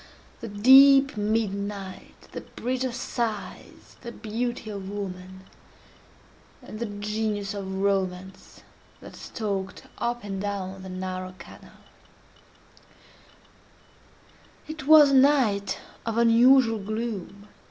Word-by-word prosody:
—the 230 Hz, -, -7 dB
deep 270 Hz, +6 st, +6 dB
midnight, 200 Hz, -2 st, -4 dB
the -, -, -6 dB
Bridge 255 Hz, +1 st, -4 dB
of 255 Hz, -2 st, -3 dB
Sighs, 235 Hz, -4 st, -5 dB
the 235 Hz, -, -7 dB
beauty 230 Hz, 0 st, -4 dB
of 195 Hz, -2 st, -7 dB
woman, 190 Hz, -2 st, -7 dB, 1.2 s
and 215 Hz, -, -9 dB
the 235 Hz, -, -3 dB
Genius 205 Hz, 0 st, -3 dB
of 195 Hz, -2 st, -6 dB
Romance 190 Hz, -1 st, -3 dB, 0.4 s
that -, -, -12 dB
stalked 200 Hz, -4 st, -5 dB, 0.2 s
up 240 Hz, 0 st, -2 dB
and 195 Hz, -2 st, -5 dB
down 195 Hz, -2 st, -4 dB
the 190 Hz, -, -9 dB
narrow 185 Hz, 0 st, -5 dB
canal. -, -, -15 dB, 2.8 s
It 310 Hz, -2 st, -8 dB
was 300 Hz, -2 st, +8 dB
a -, -, +3 dB
night 260 Hz, -8 st, +3 dB, 0.3 s
of 230 Hz, -1 st, -3 dB
unusual 235 Hz, 0 st, +5 dB
gloom. 205 Hz, -1 st, -5 dB
210 Hz, 105 wpm, -25 LUFS, 195-235 Hz, 2.8 s, was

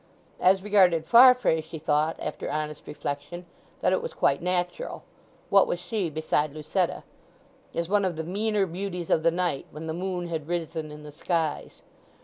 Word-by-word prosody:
As 190 Hz, +1 st, +4 dB
regarded 185 Hz, -6 st, +4 dB
Farfrae, 235 Hz, -5 st, +6 dB
she 160 Hz, +1 st, -9 dB
thought, 155 Hz, +1 st, +1 dB
after -, -, -5 dB
honest 150 Hz, 0 st, -4 dB
reflection, 150 Hz, +4 st, -5 dB, 0.4 s
that -, -, +3 dB
it -, -, +1 dB
was 485 Hz, -, -6 dB
quite -, -, +2 dB
natural. 180 Hz, -, -2 dB, 0.5 s
What 200 Hz, -1 st, +6 dB
was 175 Hz, -, -2 dB
she 180 Hz, 0 st, -2 dB
beside 155 Hz, -1 st, -1 dB
Lucetta?—as 155 Hz, +2 st, -5 dB
one 205 Hz, +2 st, +2 dB
of 185 Hz, -3 st, -1 dB
the 160 Hz, -, -4 dB
"meaner 205 Hz, +3 st, 0 dB
beauties 180 Hz, -1 st, -5 dB
of 160 Hz, -, +4 dB
the 165 Hz, -, +4 dB
night," 170 Hz, -4 st, -1 dB
when 155 Hz, +2 st, -8 dB
the 160 Hz, -, -3 dB
moon 180 Hz, 0 st, -3 dB
had 160 Hz, -3 st, -4 dB
risen 165 Hz, -2 st, -3 dB
in 150 Hz, 0 st, -10 dB
the 150 Hz, -, -9 dB
skies. 160 Hz, 0 st, -2 dB
170 Hz, 165 wpm, -26 LUFS, 155-190 Hz, 0.5 s, Farfrae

